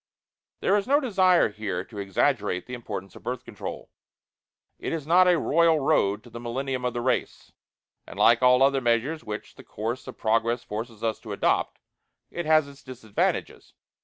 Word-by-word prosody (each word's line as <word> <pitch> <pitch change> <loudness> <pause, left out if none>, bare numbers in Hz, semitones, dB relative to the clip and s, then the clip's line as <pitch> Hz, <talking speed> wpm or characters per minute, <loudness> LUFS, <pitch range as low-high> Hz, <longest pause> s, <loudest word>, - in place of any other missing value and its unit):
There 200 - +3
is 200 - -2
no 285 +2 +4
desire 190 - +3
here 100 -4 -4
to 105 +1 -10
exaggerate 100 -1 0
the 125 - -9
importance 100 -6 -6
of - - -12
Birth 125 +1 -5
Control. - - -8 0.9
It - - -3
is 160 -4 -4
not 180 +3 +5
a 180 -1 +5
royal 165 +1 +3
road 110 -8 +1
to 120 - -15
the 120 - -8
millennium 130 +2 -3
of 125 - -2
the 120 - -1
race; 130 +2 -2 0.6
and - - -10
like 115 +1 +5
all 125 +1 +5
other 135 0 +3
measures 120 +7 0
which 105 -1 -7
the - - -14
course 115 +4 -5
of - - -9
progress 115 +2 +1
forces 110 +1 -6
us 110 -1 -1
to - - -7
adopt, - - 0 0.5
it 175 -2 -4
has 155 -2 +4
its 140 0 -14
disadvantages. 120 -5 -3
125 Hz, 180 wpm, -26 LUFS, 110-155 Hz, 0.9 s, not